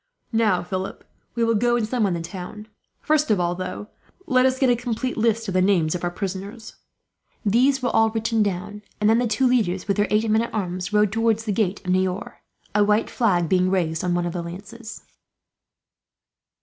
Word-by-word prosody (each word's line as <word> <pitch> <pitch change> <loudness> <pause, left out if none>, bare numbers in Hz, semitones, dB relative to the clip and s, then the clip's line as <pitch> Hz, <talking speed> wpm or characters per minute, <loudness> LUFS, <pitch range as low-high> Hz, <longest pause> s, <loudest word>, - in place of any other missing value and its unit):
"Now, 215 -5 +2
Philip, 185 +1 -5 0.3
we 235 - +1
will 230 0 +2
go 240 +2 +2
and 230 -3 0
summon 215 -6 0
the 170 - -4
town. 195 +4 -8 0.3
First 305 -2 +1
of 210 -3 +3
all, 175 0 +1
though, 185 +3 -6 0.4
let 255 0 +4
us 260 0 0
get 260 -2 +3
a - - +4
complete 245 +1 -3
list 225 0 +1
of 190 - -3
the 185 - +3
names 180 -5 +2
of 180 - -4
our 175 - +1
prisoners." 195 +4 -6 0.7
These 255 +6 +3
were 245 - +1
all 225 0 +5
written 225 0 0
down, 205 +1 -2 0.2
and 210 - +2
then 225 +2 +4
the 245 - +1
two 260 +4 +1
leaders, 210 -8 +1
with 200 - 0
their 205 - +2
eight 215 +2 +2
men 220 +1 +3
at 235 - -4
arms, 180 -2 -3
rode 210 -1 +3
towards 225 0 +1
the 215 - -1
gates 200 -1 -1
of 180 - 0
Niort, 185 +3 -1 0.4
a 210 0 +4
white 210 +2 +1
flag 180 -8 +1
being 185 +2 +2
raised 165 -4 0
on 180 -1 0
one 175 0 0
of 175 - -3
the 175 - -3
lances. 205 +7 -9
210 Hz, 205 wpm, -23 LUFS, 185-230 Hz, 0.7 s, all